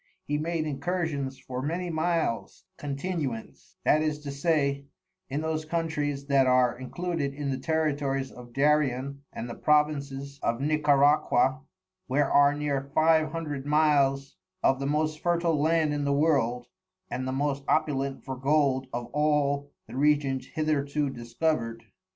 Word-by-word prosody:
He 150 0 -1
made 165 0 -1
Incursions 145 -2 -2
for 125 0 -6
many 170 +5 -2
Miles 160 -7 -1
continuance, 140 -5 -5
that 155 - +4
is 155 -1 0
to 145 -1 -5
say, 140 -1 0 0.4
in 140 +3 -2
those 160 0 -2
Countries 155 -3 -2
that 140 -2 +3
are 125 -1 +4
included 140 +2 -3
in 145 -1 -2
the 130 - -2
Territories 140 -3 -1
of 120 -1 -12
Darien 140 -1 +1
and 120 - -6
the 120 - -6
Provinces 140 -1 0
of 115 +1 0
Nicaraqua, 145 -3 +3 0.5
where 140 +3 +1
are 145 0 +5
near 140 -2 -2
Five 155 -1 +4
Hundred 150 -4 -4
Miles 140 -3 +2 0.3
of 135 - +3
the 140 - -2
most 155 +1 0
Fertil 170 -3 +1
Land 160 -1 +2
in 145 0 -1
the 140 0 +1
World, 135 -5 +2 0.5
and 130 +1 -3
the - - -1
most 140 +1 -1
opulent 140 -3 0
for 130 - -4
Gold 135 -1 +1
of 120 0 -3
all 145 -1 +1 0.2
the - - -10
Regions 140 -1 +1
hitherto 150 -2 -1
discover'd. 120 -1 -2
145 Hz, 145 wpm, -27 LUFS, 135-155 Hz, 0.5 s, are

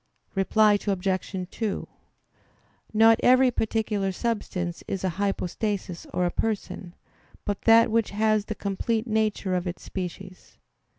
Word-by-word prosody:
Reply 210 +1 +4
Obj. 190 -1 -1
2: 220 -4 -3 1.0
Not 225 +1 +6
every 255 0 +5
particular 215 -3 -1
substance 185 -5 -3
is 195 - -3
a 190 - +1
hypostasis 195 -2 -2
or 180 - 0
a 175 - 0
person, 190 -4 -3 0.5
but 205 -1 -2
that 230 0 +6
which 225 -1 +2
has 215 0 +1
the 215 - -4
complete 215 +3 -1
nature 215 -4 0
of 180 0 -1
its 175 - -5
species. 185 0 -7
205 Hz, 125 wpm, -26 LUFS, 185-220 Hz, 1.0 s, Not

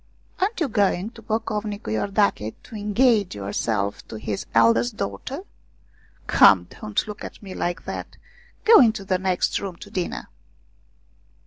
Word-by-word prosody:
Aren't 400 +3 0
you 325 - +1
going 205 -2 +1
to 235 - -13
Pocovnicu 215 - -3
lordache 195 - 0
to 230 - -11
engage 210 - +2
yourself 100 0 -2
to - - -8
his 105 -2 -4
eldest 115 +1 +4
daughter? 100 - -4 0.8
Come, 90 -3 +6
don't 105 - -3
look 210 -1 -7
at - - -9
me 190 -2 -7
like 175 -2 -3
that, - - -6 0.5
go 450 +1 +9
into 220 -5 +3
the 185 -1 +1
next 185 -1 0
room 195 -3 -5
to 205 +4 -12
dinner." 185 -5 -3
195 Hz, 140 wpm, -24 LUFS, -, 0.8 s, go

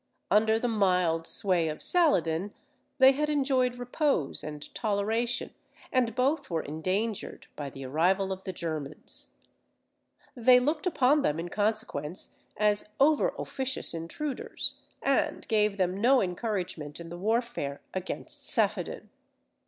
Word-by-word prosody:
Under 220 +1 +4
the 245 - -1
mild 180 -7 +2
sway 180 -5 +2
of 155 -1 -5
Saladin, 200 - +2 0.4
they 265 -1 +8
had 300 +2 -1
enjoyed 265 -4 +1
repose 245 - -1
and 150 -1 -8
toleration, 220 +2 0 0.4
and 245 -3 +1
both 270 +5 +1
were 165 -2 -1
endangered 185 +8 -3
by 145 -2 -5
the 135 0 -9
arrival 185 +8 +1
of 190 0 -5
the 190 - -4
Germans. 155 -4 -4 1.0
They 250 +1 +6
looked 300 +7 0
upon 290 -3 +3
them 155 - 0
in 175 +1 -4
consequence 205 -6 -2 0.2
as 210 0 +1
over 310 - +4
officious 265 -6 -2
intruders, 170 - -4 0.2
and - - +1
gave 210 -2 +2
them 185 +1 0
no 260 +3 +5
encouragement 180 -6 -3
in 170 -1 -8
the 175 - -7
warfare 215 - -1
against 185 -1 -4
Saphaddin. - - -1
210 Hz, 130 wpm, -29 LUFS, 170-250 Hz, 1.0 s, they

